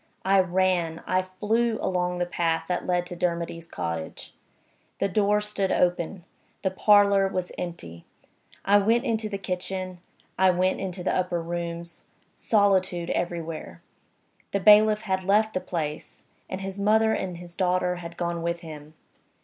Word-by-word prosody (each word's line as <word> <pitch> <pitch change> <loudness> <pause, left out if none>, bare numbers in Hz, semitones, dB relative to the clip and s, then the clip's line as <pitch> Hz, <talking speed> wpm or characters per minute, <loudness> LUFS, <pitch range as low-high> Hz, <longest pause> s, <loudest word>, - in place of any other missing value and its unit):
I 195 0 +5
ran, 180 -3 +1
I 185 +1 +2
flew, 220 +5 0
along 180 -1 -1
the 175 - 0
path 165 -2 0
that 180 - -2
led 180 -1 +1
to 175 - -7
Dermody's 170 -1 -2
cottage. 85 - -5 0.6
The 195 - +1
door 210 +1 +2
stood 210 -2 -2
open; 175 +1 0 0.4
the 190 - +1
parlor 200 0 +5
was 185 -2 -3
empty. 85 - -7 0.6
I 205 +1 +6
went 225 +5 +2
into 220 -3 -1
the 200 - -3
kitchen; 185 -1 -4 0.4
I 190 0 +6
went 185 +1 +1
into 185 -2 -4
the - - 0
upper 180 -1 0
rooms. 170 0 -5 0.3
Solitude 190 -5 +1
everywhere. 165 - -4 0.7
The 200 - +2
bailiff 210 +2 +6
had 190 -3 -1
left 210 +3 +2
the 185 - -1
place; 155 -3 -5 0.3
and 185 - -4
his 195 +1 -5
mother 220 +2 +3
and 185 -4 -3
his 175 0 -11
daughter 180 -1 0
had 170 -1 -9
gone 170 -1 -2
with 170 0 -2
him. 155 -2 -10
185 Hz, 150 wpm, -26 LUFS, 170-200 Hz, 0.7 s, I